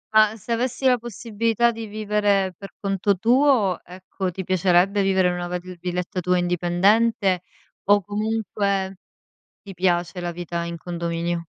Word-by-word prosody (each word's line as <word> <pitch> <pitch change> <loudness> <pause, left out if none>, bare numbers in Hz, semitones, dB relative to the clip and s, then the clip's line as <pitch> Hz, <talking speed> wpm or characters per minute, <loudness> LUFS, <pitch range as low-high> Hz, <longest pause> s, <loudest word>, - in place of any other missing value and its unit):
Ma, 215 0 +5
se 220 - -9
avessi 250 +3 -1
la 250 -2 +4
possibilità 230 +1 0
di 225 -1 -7
vivere 205 -2 0
per 195 +3 -10
conto 195 0 0
tuo, 235 - +3
ecco, 185 +1 -5
ti 190 +2 -5
piacerebbe 185 +2 +3
vivere 190 -2 +3
in 180 - -1
una 175 0 -4
vali 180 +1 -5
villetta 180 +1 -3
tua 180 +1 +2
indipendente, 180 +3 +2 0.4
o 205 +1 +5
comunque 205 -2 -1 0.7
ti 195 -2 -11
piace 175 0 0
la 175 - -3
vita 170 0 -4
in 170 0 -5
condominio? 170 0 -3
190 Hz, 145 wpm, -23 LUFS, 175-215 Hz, 0.7 s, Ma